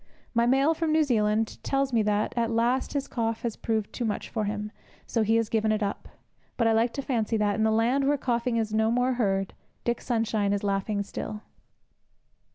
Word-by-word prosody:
My 235 Hz, 0 st, +3 dB
mail 270 Hz, +5 st, +4 dB
from 325 Hz, -1 st, -1 dB
New 315 Hz, 0 st, +4 dB
Zealand 220 Hz, -4 st, +1 dB
tells 275 Hz, -1 st, 0 dB
me 230 Hz, -, +4 dB
that, 210 Hz, 0 st, 0 dB
at 230 Hz, -1 st, +1 dB
last, 235 Hz, +3 st, +1 dB
his 280 Hz, -1 st, -2 dB
cough 225 Hz, -2 st, -2 dB
has 235 Hz, -3 st, -2 dB
proved 220 Hz, -2 st, -2 dB
too 245 Hz, -, -3 dB
much 215 Hz, -3 st, -2 dB
for 215 Hz, -2 st, -2 dB
him, 210 Hz, 0 st, -3 dB, 0.3 s
so 230 Hz, -, 0 dB
he 220 Hz, +1 st, +2 dB
has 230 Hz, -1 st, +2 dB
given 220 Hz, -1 st, +1 dB
it 215 Hz, 0 st, 0 dB
up. 200 Hz, -, -4 dB, 0.5 s
But 230 Hz, -, +2 dB
I 225 Hz, -, +4 dB
like 230 Hz, +2 st, +2 dB
to 275 Hz, -, -4 dB
fancy 230 Hz, -4 st, 0 dB
that, 210 Hz, -1 st, +1 dB
in 220 Hz, -, -1 dB
the 220 Hz, -, +3 dB
land 245 Hz, +5 st, +2 dB
where 290 Hz, +1 st, +3 dB
coughing 240 Hz, -2 st, 0 dB
is 220 Hz, -2 st, -1 dB
no 220 Hz, 0 st, +2 dB
more 245 Hz, +2 st, +2 dB
heard, 195 Hz, -5 st, 0 dB, 0.3 s
Dick 240 Hz, 0 st, -1 dB
Sunshine 220 Hz, -4 st, 0 dB
is 205 Hz, -, -2 dB
laughing 200 Hz, +1 st, 0 dB
still. 210 Hz, +1 st, -6 dB
225 Hz, 210 wpm, -27 LUFS, 210-245 Hz, 0.5 s, mail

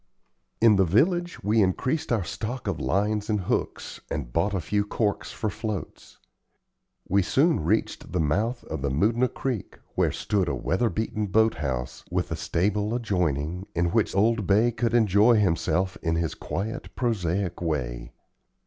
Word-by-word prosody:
In 110 Hz, -3 st, +6 dB
the 95 Hz, -, +5 dB
village 175 Hz, -, +1 dB
we 105 Hz, +3 st, +3 dB
increased 125 Hz, -, 0 dB
our 110 Hz, -5 st, +2 dB
stock 110 Hz, +10 st, -5 dB
of 100 Hz, -5 st, -2 dB
lines 105 Hz, +2 st, 0 dB
and 105 Hz, -2 st, +1 dB
hooks, 90 Hz, -, -3 dB
and 65 Hz, -6 st, -4 dB
bought 100 Hz, +5 st, +1 dB
a -, -, 0 dB
few 100 Hz, +5 st, 0 dB
corks 105 Hz, 0 st, -1 dB
for 110 Hz, -, -3 dB
floats. 105 Hz, -1 st, -5 dB, 0.9 s
We 100 Hz, +2 st, +3 dB
soon 150 Hz, -, +2 dB
reached 105 Hz, +8 st, -1 dB
the 90 Hz, -, 0 dB
mouth 105 Hz, -, 0 dB
of -, -, -5 dB
the 70 Hz, -, 0 dB
Moodna 110 Hz, -, +2 dB
Creek, 125 Hz, -7 st, -4 dB, 0.2 s
where -, -, +2 dB
stood 100 Hz, -4 st, 0 dB
a 70 Hz, -, 0 dB
weather 95 Hz, -, 0 dB
beaten 110 Hz, -1 st, -2 dB
boat 110 Hz, +3 st, +3 dB
house, 65 Hz, -4 st, -4 dB
with -, -, -1 dB
a -, -, 0 dB
stable 105 Hz, +5 st, 0 dB
adjoining, 90 Hz, -, -1 dB
in 85 Hz, 0 st, +1 dB
which 110 Hz, -1 st, +1 dB
old 110 Hz, 0 st, +2 dB
Bay 110 Hz, +4 st, +4 dB
could 120 Hz, 0 st, 0 dB
enjoy 110 Hz, +1 st, +5 dB
himself 95 Hz, 0 st, +1 dB
in 80 Hz, -1 st, 0 dB
his 85 Hz, -3 st, -1 dB
quiet, 105 Hz, +5 st, -5 dB
prosaic 100 Hz, -7 st, -1 dB
way. 65 Hz, -8 st, -3 dB
100 Hz, 160 wpm, -26 LUFS, 85-115 Hz, 0.9 s, In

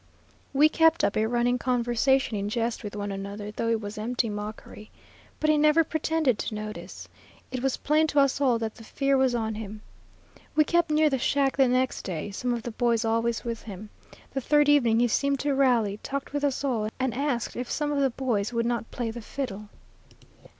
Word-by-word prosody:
We 285 Hz, +2 st, +5 dB
kept 325 Hz, +1 st, +3 dB
up -, -, +2 dB
a 215 Hz, +1 st, +2 dB
running 245 Hz, +1 st, +1 dB
conversation 245 Hz, 0 st, +1 dB
in 200 Hz, 0 st, -2 dB
jest 230 Hz, +1 st, -2 dB
with 205 Hz, -1 st, -6 dB
one 205 Hz, -1 st, -3 dB
another, 200 Hz, +1 st, -6 dB
though 230 Hz, -, -3 dB
it 225 Hz, -1 st, +1 dB
was 205 Hz, +1 st, -6 dB
empty 235 Hz, +1 st, -1 dB
mockery. 210 Hz, 0 st, -7 dB, 0.5 s
But 310 Hz, -, +3 dB
he 305 Hz, -, +3 dB
never 305 Hz, +2 st, +5 dB
pretended 315 Hz, -6 st, 0 dB
to 215 Hz, -, -3 dB
notice. 215 Hz, 0 st, -7 dB, 0.4 s
It 255 Hz, -, -3 dB
was 270 Hz, 0 st, 0 dB
plain 310 Hz, +2 st, +2 dB
to 290 Hz, -1 st, +2 dB
us 275 Hz, 0 st, +2 dB
all 255 Hz, -4 st, +3 dB
that 225 Hz, -1 st, -3 dB
the 225 Hz, -, -13 dB
fear 275 Hz, +5 st, 0 dB
was 265 Hz, -2 st, +2 dB
on 220 Hz, -2 st, -1 dB
him. 215 Hz, 0 st, -7 dB, 0.7 s
We 310 Hz, -, +6 dB
kept 340 Hz, +2 st, +1 dB
near 305 Hz, 0 st, +4 dB
the 265 Hz, -, 0 dB
shack 275 Hz, +1 st, +1 dB
the 270 Hz, -1 st, +4 dB
next 255 Hz, +1 st, +1 dB
day, 180 Hz, +2 st, -4 dB
some 245 Hz, +5 st, -2 dB
of 235 Hz, -2 st, -2 dB
the 240 Hz, -, -4 dB
boys 235 Hz, 0 st, +1 dB
always 230 Hz, +1 st, 0 dB
with 230 Hz, -1 st, -3 dB
him. 210 Hz, 0 st, -9 dB, 0.4 s
The 270 Hz, -, -1 dB
third 295 Hz, +3 st, +3 dB
evening 240 Hz, -6 st, +4 dB
he 245 Hz, -, +4 dB
seemed 280 Hz, +4 st, +1 dB
to 285 Hz, 0 st, 0 dB
rally, 240 Hz, -7 st, +2 dB
talked 275 Hz, 0 st, -5 dB
with 290 Hz, 0 st, -2 dB
us 280 Hz, -1 st, 0 dB
all, 230 Hz, -6 st, 0 dB
and 260 Hz, -2 st, 0 dB
asked 265 Hz, -3 st, -2 dB
if 245 Hz, 0 st, -4 dB
some 295 Hz, -1 st, -1 dB
of 290 Hz, -, 0 dB
the 270 Hz, -, +3 dB
boys 235 Hz, -5 st, -1 dB
would 230 Hz, -1 st, 0 dB
not 235 Hz, -1 st, -2 dB
play 235 Hz, -2 st, -3 dB
the 235 Hz, +1 st, -7 dB
fiddle. 215 Hz, -4 st, -5 dB
240 Hz, 210 wpm, -27 LUFS, 220-275 Hz, 0.7 s, We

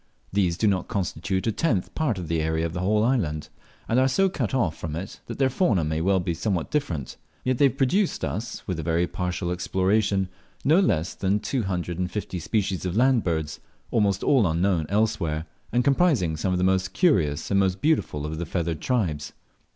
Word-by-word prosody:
These 90 Hz, -4 st, +1 dB
do -, -, 0 dB
not 95 Hz, -3 st, +1 dB
constitute 95 Hz, -1 st, -2 dB
a 115 Hz, -, +2 dB
tenth 110 Hz, -, 0 dB
part 145 Hz, -10 st, 0 dB
of 90 Hz, -3 st, -5 dB
the 80 Hz, 0 st, 0 dB
area 80 Hz, +1 st, 0 dB
of 85 Hz, -, -4 dB
the 90 Hz, -, -3 dB
whole 105 Hz, +4 st, +2 dB
island, 90 Hz, -, 0 dB, 0.4 s
and 115 Hz, -, +2 dB
are 130 Hz, -, +4 dB
so 195 Hz, +9 st, +3 dB
cut 135 Hz, -, -2 dB
off 105 Hz, -12 st, +1 dB
from 80 Hz, -3 st, -5 dB
it, 95 Hz, +4 st, -6 dB
that -, -, -6 dB
their 135 Hz, -, +3 dB
fauna 115 Hz, -, +2 dB
may 80 Hz, +1 st, -1 dB
well 95 Hz, +2 st, +3 dB
he 85 Hz, -, 0 dB
somewhat 85 Hz, 0 st, -2 dB
different; 85 Hz, -, -2 dB, 0.3 s
yet 130 Hz, -1 st, 0 dB
they 145 Hz, -, +6 dB
have 130 Hz, -, -4 dB
produced 175 Hz, -, +1 dB
us 95 Hz, +10 st, -5 dB
(with 90 Hz, -4 st, -2 dB
a -, -, -1 dB
very 85 Hz, +2 st, +1 dB
partial 90 Hz, 0 st, -3 dB
exploration) 95 Hz, +2 st, +1 dB, 0.4 s
no 155 Hz, +6 st, +5 dB
less 85 Hz, -, +1 dB
than 100 Hz, +2 st, 0 dB
two 125 Hz, +4 st, -1 dB
hundred 90 Hz, -3 st, -3 dB
and 90 Hz, -1 st, -1 dB
fifty 95 Hz, -2 st, -4 dB
species 95 Hz, +1 st, -1 dB
of 90 Hz, +2 st, -2 dB
land 130 Hz, -1 st, +4 dB
birds, 80 Hz, -3 st, -2 dB, 0.3 s
almost 100 Hz, -4 st, +1 dB
all 125 Hz, -9 st, +4 dB
unknown 85 Hz, -1 st, +1 dB
elsewhere, 100 Hz, -7 st, 0 dB, 0.3 s
and 125 Hz, +2 st, +2 dB
comprising 135 Hz, -, +2 dB
some 90 Hz, +4 st, -1 dB
of 90 Hz, -, +1 dB
the 90 Hz, -, 0 dB
most 95 Hz, 0 st, +1 dB
curious 80 Hz, -, +2 dB
and 100 Hz, -, +4 dB
most 95 Hz, -1 st, +1 dB
beautiful 145 Hz, -, 0 dB
of 80 Hz, +1 st, -4 dB
the 85 Hz, -, -2 dB
feathered 85 Hz, -2 st, -2 dB
tribes. 85 Hz, -, -1 dB
95 Hz, 205 wpm, -25 LUFS, 85-115 Hz, 0.4 s, they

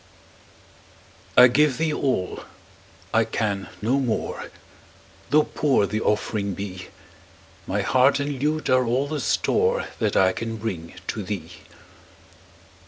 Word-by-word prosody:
I -, -, +11 dB
give 140 Hz, +1 st, +3 dB
thee 160 Hz, -1 st, 0 dB
all 125 Hz, -12 st, -1 dB, 0.7 s
I 115 Hz, -, +4 dB
can 105 Hz, -3 st, -2 dB
no 130 Hz, +5 st, +2 dB
more 125 Hz, -5 st, -2 dB, 0.8 s
Tho' 150 Hz, +1 st, +5 dB
poor 140 Hz, -10 st, +1 dB
the 110 Hz, +2 st, -2 dB
offering 105 Hz, -2 st, -1 dB
be; 95 Hz, -1 st, -6 dB, 0.8 s
My -, -, -1 dB
heart 130 Hz, +2 st, +3 dB
and 140 Hz, -2 st, -3 dB
lute 155 Hz, +2 st, 0 dB
are 130 Hz, 0 st, +4 dB
all 125 Hz, +4 st, 0 dB
the 150 Hz, 0 st, -3 dB
store 470 Hz, -, +1 dB
That 110 Hz, -3 st, +1 dB
I 95 Hz, -1 st, +5 dB
can 115 Hz, +3 st, -4 dB
bring 90 Hz, -6 st, -5 dB
to 110 Hz, -, -2 dB
thee. 90 Hz, -4 st, -5 dB
115 Hz, 125 wpm, -24 LUFS, 100-140 Hz, 0.8 s, I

